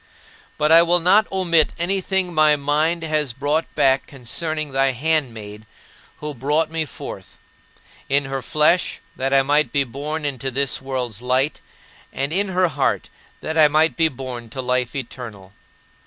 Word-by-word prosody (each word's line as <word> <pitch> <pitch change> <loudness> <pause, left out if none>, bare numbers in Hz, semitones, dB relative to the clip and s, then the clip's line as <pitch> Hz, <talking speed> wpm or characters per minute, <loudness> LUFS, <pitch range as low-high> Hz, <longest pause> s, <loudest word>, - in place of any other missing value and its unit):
But 150 +1 +1
I 165 +1 +9
will 175 +1 +3
not 195 +6 +3
omit 170 -5 +2
anything 190 0 -1
my 155 -1 +5
mind 155 +4 0
has 155 -5 0
brought 145 +5 -1
back 135 0 +2
concerning 150 +4 -3
thy 135 0 +2
handmaid 115 -7 -2 0.5
who 150 0 -5
brought 150 +5 0
me 160 -1 -1
forth - - -9 0.7
in 140 +1 +2
her 135 0 -4
flesh, 155 +7 +1 0.2
that 135 +1 -2
I 135 0 +4
might 145 -2 +2
be 140 - +2
born 145 +5 -5
into 135 -1 -3
this 135 +1 -1
world's 125 -5 -4
light, 130 +4 0 0.5
and 140 +3 -3
in 200 +3 0
her 185 -1 +1
heart, 145 -3 -1 0.3
that 160 +1 -2
I 155 - +8
might 155 +2 +2
be 165 -1 +3
born 125 -4 -7
to 130 - -5
life 125 -1 -1
eternal. 115 -7 -8
145 Hz, 155 wpm, -21 LUFS, 130-160 Hz, 0.7 s, I